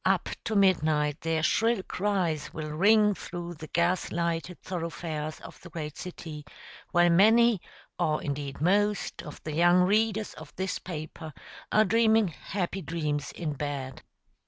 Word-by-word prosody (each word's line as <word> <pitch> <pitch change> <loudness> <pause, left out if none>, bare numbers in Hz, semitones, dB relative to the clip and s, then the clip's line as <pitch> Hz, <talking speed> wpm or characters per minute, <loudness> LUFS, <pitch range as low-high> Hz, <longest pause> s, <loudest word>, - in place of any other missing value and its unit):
Up - - +2 0.2
to 220 - -1
midnight 155 -6 +2
their 160 -1 0
shrill 225 +3 +2
cries 185 -7 -1
will 155 -1 -5
ring 210 +6 +5
through 175 -2 -6
the 155 -1 -9
gas 170 +3 +1
lighted 170 +1 -2
thoroughfares 165 -3 -4
of - - -12
the - - -11
great 155 -3 -6
city, 160 -4 -7 0.5
while 175 0 +4
many 220 +3 +5 0.4
or, 155 -1 +1
indeed, 140 -1 -4
most 205 +5 +1
of 150 - -9
the 155 - -4
young 175 +3 +5
readers 215 +2 +1
of - - -12
this 190 0 -2
paper 160 -2 -7 0.4
are 215 +1 +5
dreaming 220 0 +4
happy 190 +4 -4
dreams 150 -4 -2
in 160 -4 -3
bed. 140 -2 -4
170 Hz, 145 wpm, -28 LUFS, 155-195 Hz, 0.5 s, ring